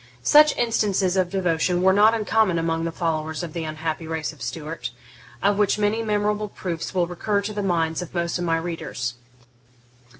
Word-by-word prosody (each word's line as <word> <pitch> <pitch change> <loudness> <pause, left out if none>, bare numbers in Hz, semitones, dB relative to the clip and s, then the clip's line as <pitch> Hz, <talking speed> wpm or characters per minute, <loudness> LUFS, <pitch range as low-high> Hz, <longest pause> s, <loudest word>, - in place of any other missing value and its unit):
Such 300 - +6
instances 205 -5 +1
of 185 -2 +1
devotion 180 -1 0
were 190 0 +5
not 215 +3 +5
uncommon 215 -4 +2
among 165 0 -1
the 165 - -2
followers 160 -1 -2
of 165 -3 -6
the 165 -2 -3
unhappy 155 +1 -4
race 160 -1 -3
of 145 - -18
Stuart, 155 -1 -5 0.5
of 200 +1 +2
which 210 -1 +3
many 210 +2 +1
memorable 210 -1 0
proofs 175 -2 -5
will 180 -1 +3
recur 200 +4 -1
to 215 +1 -4
the 205 - -2
minds 165 -3 0
of 175 - -7
most 170 0 -1
of - - -2
my 165 -1 +1
readers. 160 -7 -4
175 Hz, 180 wpm, -23 LUFS, 165-205 Hz, 0.5 s, Such